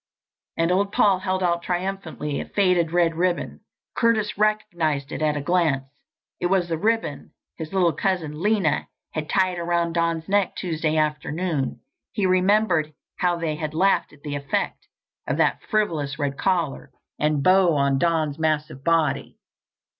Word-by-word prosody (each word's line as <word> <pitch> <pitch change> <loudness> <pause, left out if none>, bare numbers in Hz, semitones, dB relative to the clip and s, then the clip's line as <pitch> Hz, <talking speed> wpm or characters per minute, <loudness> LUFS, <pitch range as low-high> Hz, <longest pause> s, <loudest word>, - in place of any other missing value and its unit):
And 165 +1 +2
old 200 +2 +1
Paul 200 -3 +3
held 185 0 -1
out 170 -1 +1
triumphantly 175 -5 -3
a - - -6
faded 180 -5 +2
red 170 -1 +3
ribbon. 175 +1 -1 0.4
Curtis 220 -3 +1
recognized 175 -9 0
it - - -5
at 150 -1 +1
a - - -2
glance. 155 -4 +1 0.5
It 175 - +1
was 180 -1 +2
the 165 - -1
ribbon 225 -7 -1 0.2
his 160 -2 -6
little 180 -4 +2
cousin, 160 -3 -2
Lena, 205 -5 +1 0.2
had 155 -1 -4
tied 185 -2 +1
around 170 0 0
Don's 170 -1 0
neck 200 -1 +1
Tuesday 160 -3 -1
afternoon. 155 -1 -1 0.3
He 205 - 0
remembered 185 -4 +2 0.2
how 180 -1 +1
they 165 -3 -2
had 155 0 -4
laughed 195 +4 +2
at 145 -1 -20
the 145 - -4
effect 140 -1 -2 0.4
of - - -1
that - - +2
frivolous 155 -11 0
red 140 -1 -2
collar 170 -5 -1 0.3
and 150 -2 +1
bow 185 -2 +5
on 140 -1 +2
Don's 160 -3 0
massive 150 -4 -1
body. 165 -3 +1
170 Hz, 155 wpm, -24 LUFS, 155-185 Hz, 0.5 s, bow